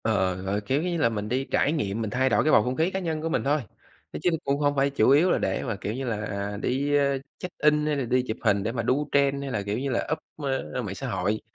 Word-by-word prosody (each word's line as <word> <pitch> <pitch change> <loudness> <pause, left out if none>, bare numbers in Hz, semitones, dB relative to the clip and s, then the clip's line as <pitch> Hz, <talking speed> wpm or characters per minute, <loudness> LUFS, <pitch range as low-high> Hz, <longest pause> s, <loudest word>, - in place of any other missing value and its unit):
Ờ, 110 - +2
ờ, 95 -3 +1
gọi, 100 +2 -1
kiểu 135 +8 0
như 175 -1 -1
là 130 -7 +3
mình 105 -2 -4
đi 130 +3 0
trải 145 - +2
nghiệm, 115 -9 -1
mình 110 - -2
thay 130 +4 +1
đổi 105 - +3
cái 155 - +3
bầu 105 - +6
không 125 +2 -2
khí 160 +5 +1
cá 190 - -2
nhân 160 -4 -2
của 165 - -2
mình - - 0
thôi, 145 +2 +2 0.6
nói - - -4
chứ - - +4
cũng 140 0 0
hông 145 -1 +2
phải 140 0 +3
chủ 135 -5 +2
yếu 155 +7 +5
là - - +3
để - - -1
mà, 115 -4 -2
kiểu 100 +1 -4
như 135 +3 -4
là, 115 -4 -1
à, 100 0 -4
đi, 140 +3 0
ơ, 140 -1 +2 0.2
check 180 0 -7
in 150 0 +3
hay 150 -1 +1
là 140 - -1
đi 125 +2 +2
chụp 110 - -3
hình 100 -4 +2
để 110 - -1
mà 115 -1 -2
đu 140 +6 0
trend 140 0 +2
hay 140 -1 -4
là, 105 - -1
kiểu 100 +1 -2
như 140 +1 -2
là, 120 - -1
up 160 - +1 0.7
mạng - - -5
xã - - -5
hội. 105 +4 -1
130 Hz, 300 wpm, -26 LUFS, 110-145 Hz, 0.7 s, bầu